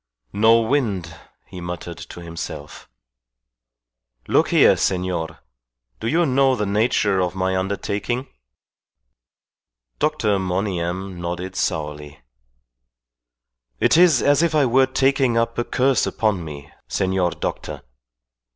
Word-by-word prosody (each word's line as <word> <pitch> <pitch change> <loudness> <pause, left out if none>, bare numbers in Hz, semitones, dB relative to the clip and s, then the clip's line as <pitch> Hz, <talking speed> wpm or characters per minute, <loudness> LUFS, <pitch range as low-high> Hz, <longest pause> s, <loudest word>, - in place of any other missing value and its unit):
"No 115 +2 +5
wind!" 105 - -1 0.3
he 90 - -10
muttered 85 -1 -6
to 85 0 -10
himself. 80 -3 -8 1.4
"Look - - +3
here, - - +5
senor 90 -3 -2 0.6
do - - -4
you 170 +7 +2
know 135 -1 +3
the 105 - -2
nature 100 -1 +1
of 90 0 -1
my 95 0 0
undertaking?" 100 +6 -2 1.7
Dr. 130 -10 +1
Monygham 95 -1 -3
nodded 90 +2 -4
sourly. 75 -3 -3 1.6
"It - - +3
is 170 -5 +5
as 145 +2 +4
if 170 -2 +1
I 145 -2 +4
were 130 +2 +4
taking 135 -2 +2
up 115 0 0
a - - +1
curse 130 +2 +1
upon 105 -6 0
me, 75 -2 -9 0.2
senor 95 -1 0
doctor. - - -5
100 Hz, 115 wpm, -21 LUFS, 90-125 Hz, 1.7 s, No